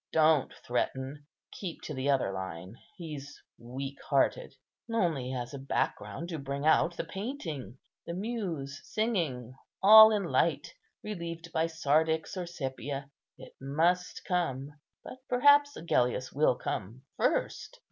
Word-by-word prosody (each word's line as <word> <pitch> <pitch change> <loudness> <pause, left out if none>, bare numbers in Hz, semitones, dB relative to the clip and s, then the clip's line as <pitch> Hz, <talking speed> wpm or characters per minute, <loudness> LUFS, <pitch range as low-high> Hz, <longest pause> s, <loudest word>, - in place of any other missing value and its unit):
Don't 155 -3 +4
threaten; 135 +4 -2 0.2
keep 180 -4 -7
to 155 - -5
the 130 +1 -2
other 130 -8 +2
line; 95 +1 -6 0.2
he's 150 -5 -8 0.2
weak 135 +3 -6
hearted." 140 -1 +1 0.4
"Only 160 - 0
as 125 0 -4
a 140 - -6
background 150 +4 -2
to 165 -3 -4
bring 140 +1 -4
out 165 +2 +3
the - - -1
painting; 165 - -6 0.3
the 170 - -4
Muse 180 - -4
singing, 165 - -2 0.3
all 220 +2 +11
in 210 -2 +1
light, - - 0 0.3
relieved 170 -5 -6
by 160 +1 +2
sardix 160 +2 +1
or 180 -2 -4
sepia. 140 -3 -5 0.3
It - - -13
must 170 +6 0
come; 145 -7 -1 0.3
but 260 - -10
perhaps 285 +3 +5
Agellius 130 -5 0
will 145 -3 +3
come 115 +5 -5
first." - - -1
155 Hz, 130 wpm, -30 LUFS, 135-175 Hz, 0.4 s, all